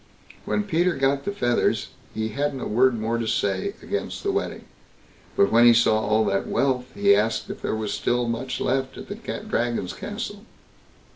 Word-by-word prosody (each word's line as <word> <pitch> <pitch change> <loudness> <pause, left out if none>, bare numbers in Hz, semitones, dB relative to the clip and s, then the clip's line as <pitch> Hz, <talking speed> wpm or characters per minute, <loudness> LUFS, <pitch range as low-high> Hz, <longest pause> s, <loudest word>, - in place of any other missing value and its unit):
When 210 - 0
Peter 175 -2 +1
got 135 +1 +1
the 200 - -1
feathers 120 -12 +1 0.2
he 110 0 -2
hadn't 140 +4 -2
a - - -4
word 120 +1 +3
more 115 +2 -1
to 115 - -2
say 95 -3 0
against - - -4
the - - +1
wedding; - - -3 0.7
but 100 - +4
when 115 +1 +6
he 120 - +7
saw 110 -2 +4
all 110 0 +2
that 100 -1 0
wealth, 130 -2 0
he 100 0 +5
asked 110 +2 0
if - - -9
there - - -1
was 110 -2 -2
much 120 +1 0
still - - -3
left 130 +1 -1
at - - -9
the 210 +1 -5
Dragon's 120 - -1
castle. 205 -1 -6
120 Hz, 185 wpm, -24 LUFS, 110-140 Hz, 0.7 s, he